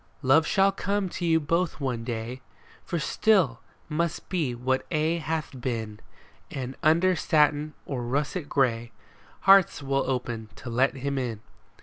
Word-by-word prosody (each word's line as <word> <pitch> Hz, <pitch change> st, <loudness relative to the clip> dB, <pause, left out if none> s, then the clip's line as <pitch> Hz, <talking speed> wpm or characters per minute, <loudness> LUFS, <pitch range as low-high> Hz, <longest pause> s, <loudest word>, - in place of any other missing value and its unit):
Love 150 Hz, +5 st, +4 dB
shall 195 Hz, 0 st, +4 dB
come 200 Hz, -1 st, -1 dB
to 175 Hz, -, -4 dB
you 160 Hz, -1 st, +4 dB
both 165 Hz, +2 st, -1 dB
one 125 Hz, -5 st, -2 dB
day. 120 Hz, +2 st, -5 dB, 0.4 s
For 170 Hz, -, -3 dB
still 165 Hz, -, +2 dB, 0.3 s
must 165 Hz, +1 st, -2 dB
be 155 Hz, -10 st, -1 dB
what 130 Hz, +2 st, 0 dB
aye 160 Hz, +2 st, +1 dB
hath 155 Hz, -4 st, -3 dB
been; 110 Hz, -4 st, -3 dB, 0.5 s
And 130 Hz, 0 st, -5 dB
under 170 Hz, +4 st, +4 dB
satin 150 Hz, -1 st, +2 dB
or 130 Hz, -3 st, -3 dB
russet 145 Hz, +6 st, -2 dB
gray 120 Hz, -4 st, +1 dB, 0.5 s
Hearts 195 Hz, -6 st, +5 dB
will 135 Hz, -1 st, 0 dB
open 120 Hz, -4 st, -3 dB
to 120 Hz, -, -8 dB
let 130 Hz, +4 st, +2 dB
him 140 Hz, +1 st, -2 dB
in. 115 Hz, -4 st, -4 dB
140 Hz, 145 wpm, -26 LUFS, 125-165 Hz, 0.5 s, Hearts